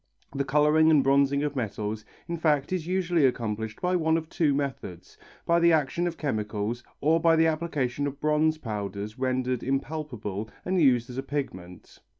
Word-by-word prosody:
The 140 - 0
colouring 150 +3 +4
and 150 -4 +5
bronzing 140 +1 +3
of 145 -1 -2
metals 110 -3 -3 0.2
in 170 - -2
fact 155 -1 +1
is 175 -3 -2
usually 175 -3 +1
accomplished 110 -4 -1
by 180 0 0
one 160 -2 +2
of 160 -1 -5
two 155 -4 +1
methods, 135 -11 -4 0.3
by 170 0 +3
the 170 0 +5
action 160 +3 +1
of 170 - -4
chemicals 110 -3 -3 0.2
or 160 +3 +3
by 165 0 +4
the 160 0 +4
application 150 -4 -1
of 140 0 -6
bronze 155 +1 +2
powders 105 -2 -5
rendered 130 -1 -1
impalpable 130 -7 -3 0.2
and 185 -1 +1
used 125 -4 +3
as 125 - -5
a - - -3
pigment. 95 -12 -6
140 Hz, 170 wpm, -27 LUFS, 120-160 Hz, 0.3 s, and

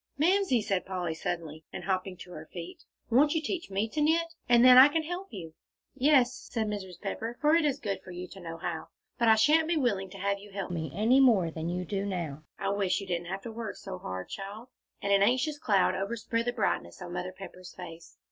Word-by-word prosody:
"Mamsie," 335 - +3
said 195 -3 0
Polly, 180 -3 -3
suddenly, 160 -1 -4
and - - -6
hopping 185 -1 -2
to 180 - -11
her 155 -2 -9
feet, 170 -1 -8 0.3
"won't 290 +6 +4
you - - +3
teach 345 - -3
me 200 +3 0
to 300 - -2
knit, 330 +2 +2 0.2
and 240 0 +6
then 255 0 +10
I 260 +2 +11
can 320 +2 0
help 355 +4 -5
you." 165 -6 -8 0.4
"Yes," 270 -2 +4 0.2
said 225 -2 0
Mrs. 190 -4 -5
Pepper; 225 +4 -4
"for 300 +1 +4
it's 300 -5 +3
good 200 -7 -3
for 185 - -14
you 180 0 -6
to 195 - -11
know 165 -2 -7
how. 165 -2 -4 0.3
But 235 - +3
I 220 - +8
shan't 305 +8 +4
be 340 -1 +1
willing 205 -9 0
to 195 - -10
have 200 +1 -1
you 205 +1 -13
help 195 -3 -4
me 160 -4 -3
any 230 +6 +4
more 215 -11 +5
than 160 +1 -4
you 180 +1 -2
do 195 +1 -2
now. 170 -7 -4 0.2
I 195 - -2
wish 200 -2 +1
you 200 - -6
didn't 175 -2 -3
have 190 +2 -5
to 230 - -6
work 225 -1 -5
so 190 -2 -7
hard, 95 - -5
child," 205 +5 -7 0.3
and 200 0 +2
an 200 - +5
anxious 255 +8 +2
cloud 200 -8 +3
overspread 230 +3 -2
the 245 - 0
brightness 195 - -1
on 175 -1 -7
Mother 180 +1 -3
Pepper's 185 -1 -11
face. 165 -2 -10
200 Hz, 230 wpm, -29 LUFS, 180-250 Hz, 0.4 s, I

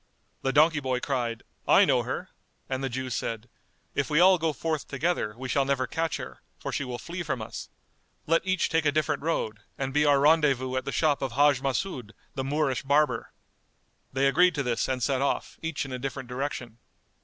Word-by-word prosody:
The 135 - 0
donkey 155 +2 +5
boy 130 -2 -1
cried, 120 -4 -2 0.2
"I - - +7
know - - +3
her;" - - -5 0.4
and 130 0 -3
the 135 - -1
Jew 130 +1 -4
said, 115 0 -3 0.5
"If - - -1
we 150 - +3
all 185 0 +6
go 160 0 +1
forth 155 0 -3
together, 135 -7 -1
we 130 +1 -5
shall 140 +2 +2
never 135 -1 0
catch 165 +2 -2
her; - - -9 0.2
for - - -5
she - - -1
will 125 -2 -5
flee 175 +7 -6
from 150 -7 -2
us. 110 - -7 0.6
Let 165 +1 +3
each 185 -1 +1
take 160 -2 +2
a - - +4
different 150 -1 0
road, 125 -9 -1 0.2
and 135 -1 -3
be 150 +1 +3
our 145 -2 +5
rendezvous 140 -4 +3
at 130 - -1
the 140 - -2
shop 150 -2 +2
of 135 -3 -2
Hajj 145 0 +4
Mas'úd, 135 - -2 0.2
the 135 - -3
Moorish 140 -1 0
barber." 145 +2 +1 0.8
They 135 +1 +2
agreed 175 +6 +4
to 140 - 0
this 120 -2 0
and 130 -2 -1
set 135 0 +1
off, 140 - -1
each 160 -4 -2
in 135 - -8
a 130 - -4
different 135 0 -5
direction. 125 -3 -4
140 Hz, 205 wpm, -27 LUFS, 130-155 Hz, 0.8 s, I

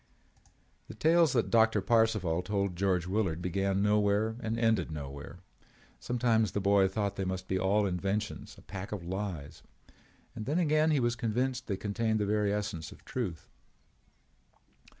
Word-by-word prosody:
The - - -9
tales 165 -2 +4
that 120 -3 +1
Doctor 115 -2 +4
Parcival 100 -5 +2
told 100 -1 -1
George 90 -1 +1
Willard 95 -4 0
began 95 +2 0
nowhere 105 +1 +2
and 115 -1 -2
ended 115 -7 +2
nowhere. 70 +3 -7 0.6
Sometimes 115 -4 +1
the - - 0
boy 100 0 +4
thought 100 0 -2
they 95 - -1
must 95 0 -4
all 95 +3 +2
be 100 - +1
inventions, 100 +4 -3
a - - -16
pack 95 0 -7
of 105 -4 -4
lies. 90 -5 -5 0.7
And 110 -1 -6
then 150 +4 0
again 155 -2 +3
he 150 -3 +3
was 120 -1 +1
convinced 120 +2 -1
that 100 - -1
they - - -3
contained 110 +2 -1
the 105 - +1
very 105 0 +1
essence 100 -7 -3
of - - -15
truth. 95 -11 -4
105 Hz, 160 wpm, -30 LUFS, 95-115 Hz, 0.7 s, tales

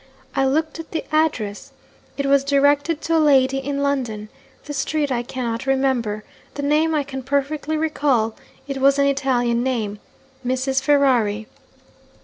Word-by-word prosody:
I 270 - +2
looked 315 +4 0
at 325 - -8
the 320 - -3
address. 245 -10 -1 0.4
It 280 - -1
was 275 0 +4
directed 285 +3 +2
to 330 - 0
a - - +4
lady 270 -2 +4
in 280 +1 -2
London. 240 -7 -2 0.4
The 295 - -6
street 290 +1 -1
I 240 -2 0
cannot 240 0 -4
remember. 255 -6 0 0.3
The 285 - -4
name 310 +2 +2
I 295 - +1
can 265 -1 -6
perfectly 285 +3 -1
recall: 285 -8 +1 0.3
it 275 -1 -3
was 275 +1 +4
an 280 - +3
Italian 255 -4 +1
name 225 -5 -2 0.4
'Mrs. 260 +1 0
Ferrari.' 250 -7 +2
275 Hz, 150 wpm, -21 LUFS, 245-285 Hz, 0.4 s, was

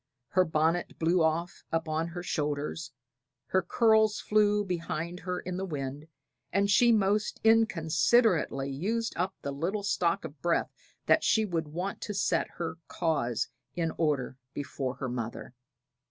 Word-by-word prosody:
Her 185 - +4
bonnet 165 +1 0
blew 170 +2 +2
off 160 +2 0
upon 165 0 -1
her 175 +1 -6
shoulders, 150 0 -2 0.6
her 190 - +3
curls 220 -1 +3
flew 210 -1 +2
behind 170 -1 -3
her 180 0 -3
in 180 0 -5
the 190 - -2
wind, 145 -2 -5 0.4
and 200 +2 +2
she 240 +4 +6
most 210 -1 +2
inconsiderately 180 - +3
used 220 +11 -1
up 185 +3 -1
the 140 - -2
little 185 +9 -2
stock 175 -4 +1
of 145 -1 -10
breath 170 -1 +1 0.3
that - - +4
she 220 -1 +3
would 165 -5 -2
want 180 +6 -4
to 210 - -4
set 195 - +1
her 165 -1 -4
cause 140 -9 -1 0.3
in 165 -2 0
order 145 -5 0 0.2
before 135 -2 -3
her 130 - -4
mother. 120 -1 -5
170 Hz, 145 wpm, -29 LUFS, 155-195 Hz, 0.6 s, she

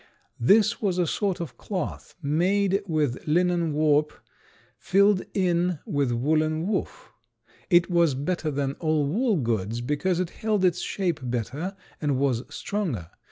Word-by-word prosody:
This 210 - +4
was 190 -4 0
a 180 - +2
sort 195 +2 -1
of 165 -7 -7
cloth 185 -6 -5
made 190 +7 +2
with 150 -6 -1
linen 170 0 +2
warp 150 0 +2 0.7
filled 200 +1 +3
in 180 -2 +1
with 140 -4 0
woolen 155 +6 +1
woof. 210 - -3 0.6
It 175 -2 +5
was 170 -6 +3
better 155 +3 -2
than 140 -1 -1
all 155 -3 +1
wool 215 - +1
goods 115 -4 -1
because 150 +8 -1
it 185 -2 -2
held 215 -3 0
its 180 - +2
shape 175 -6 -2
better 130 - -3 0.3
and 145 -3 +1
was 130 -4 +1
stronger. 150 - -3
165 Hz, 140 wpm, -26 LUFS, 145-185 Hz, 0.7 s, It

